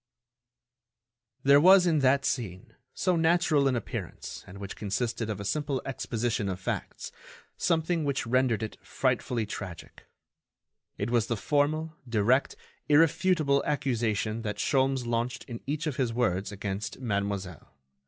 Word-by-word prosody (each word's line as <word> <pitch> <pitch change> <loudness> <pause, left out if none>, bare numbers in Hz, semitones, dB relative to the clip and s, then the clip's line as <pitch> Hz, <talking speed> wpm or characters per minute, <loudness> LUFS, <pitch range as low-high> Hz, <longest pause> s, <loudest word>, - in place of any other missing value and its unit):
There 140 +1 +6
was 185 +2 +7
in 165 -3 +3
that 135 0 +3
scene, 95 -7 -3 0.2
so 185 - +1
natural 160 -3 +3
in 130 - +2
appearance 120 - -6
and 100 0 -10
which 100 0 -7
consisted 110 +2 -2
of 105 -2 -3
a 100 - -5
simple 140 +4 -1
exposition 115 -4 -2
of 95 -1 -4
facts, 95 - -4 0.4
something 165 0 +1
which 140 -4 -1
rendered 120 -2 +2
it 110 - -7
frightfully 125 -3 -1
tragic—it 100 +2 -10
was 115 -2 +2
the 115 - -1
formal, 155 +5 0
direct, 120 +4 +2 0.3
irrefutable 155 -1 +3
accusation 115 -6 -1
that 105 -2 -4
Sholmes 135 -1 +1
launched 120 +1 -2
in 115 -1 -8
each 150 +3 -2
of 150 -4 -2
his 125 -4 +1
words 100 -5 0
against 100 +2 -4
Mademoiselle. 100 - -3
125 Hz, 135 wpm, -28 LUFS, 105-145 Hz, 0.4 s, was